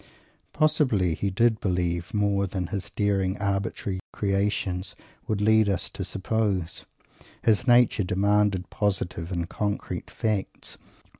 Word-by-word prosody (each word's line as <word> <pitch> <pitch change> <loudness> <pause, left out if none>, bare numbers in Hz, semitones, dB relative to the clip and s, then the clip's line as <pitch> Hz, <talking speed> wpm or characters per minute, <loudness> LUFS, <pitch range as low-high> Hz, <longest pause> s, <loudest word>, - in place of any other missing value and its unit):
Probably 140 - +2
he 100 +5 -1
did 110 +3 +2
"believe" 90 -2 -1
more 100 -2 +1
than 95 -1 -3
his 100 -2 -2
daring, 100 -2 0
arbitrary 100 -1 -2
"creations" 100 -2 -1 0.3
would 105 -2 -1
lead 110 0 +4
us 95 -3 -1
to - - -4
suppose. 100 -3 -1 0.6
His 110 0 +3
nature 120 -4 +5
demanded 100 0 +1
positive 95 -4 -1
and 85 -2 -2
concrete 105 +2 -3
facts. 105 -3 -3
100 Hz, 120 wpm, -26 LUFS, 95-105 Hz, 0.6 s, nature